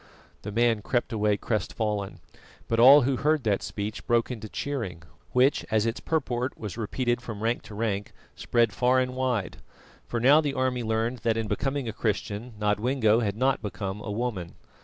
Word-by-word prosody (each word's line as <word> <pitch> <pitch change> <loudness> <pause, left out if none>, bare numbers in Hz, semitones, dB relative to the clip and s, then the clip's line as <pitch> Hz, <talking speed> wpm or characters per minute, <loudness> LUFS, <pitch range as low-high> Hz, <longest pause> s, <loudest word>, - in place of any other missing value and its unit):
The 105 - -6
man 115 0 +2
crept 120 +2 -1
away 105 -1 +1
crestfallen; 105 -4 -2 0.5
but 115 - 0
all 135 +4 +9
who 130 +1 +1
heard 150 0 +1
that 105 -3 +1
speech 105 +1 -5
broke 120 +1 +2
into 110 -3 -6
cheering, 110 -14 -4 0.3
which, 130 +3 +3
as 110 0 +2
its 115 0 -1
purport 130 -5 -2
was 105 -3 -6
repeated 120 +2 -1
from 110 -3 -7
rank 115 +2 0
to 105 - -10
rank, 105 -2 -2 0.2
spread 115 -3 +1
far 125 +1 +3
and 125 0 -1
wide; 125 -6 -1 0.5
for 120 - -2
now 140 +6 +6
the 145 -2 -2
army 130 -1 0
learned 115 +2 -1
that 115 0 0
in 110 -1 -1
becoming 135 +2 -2
a 110 - -3
Christian, 110 +1 -3
Nodwengo 110 +2 +2
had 105 -3 -1
not 130 +2 +1
become 100 -1 -4
a - - -6
woman. 105 -5 -3
115 Hz, 180 wpm, -27 LUFS, 105-125 Hz, 0.5 s, all